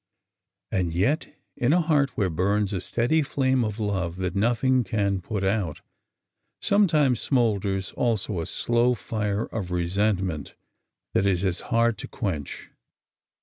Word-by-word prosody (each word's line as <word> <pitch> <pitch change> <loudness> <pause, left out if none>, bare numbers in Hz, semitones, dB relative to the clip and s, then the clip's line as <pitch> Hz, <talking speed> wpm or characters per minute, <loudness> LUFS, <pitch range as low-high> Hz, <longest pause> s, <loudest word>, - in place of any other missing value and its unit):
'' - - -60
And 90 -3 0
yet 115 - 0 0.2
in 125 +4 +2
a 175 - +4
heart 150 -4 +1
where 95 -5 +1
burns 100 +4 +1
a 95 - -2
steady 120 - +1
flame 130 -3 +1
of 105 0 -3
love 95 -5 -1
that 90 0 -3
nothing 120 +4 +2
can 100 -2 0
put 100 +2 -3
out, 95 -6 -1 0.8
sometimes 155 - +3
smolders 100 -7 0
also 110 -5 -1
a 80 - -5
slow 120 +1 +1
fire 105 -1 -2
of 100 -5 -5
resentment 90 -2 -1 0.6
that 100 - +2
is 95 -1 +1
as 90 -2 0
hard 115 -2 +2
to - - -6
quench. 80 - -4
105 Hz, 145 wpm, -25 LUFS, 95-120 Hz, 0.8 s, a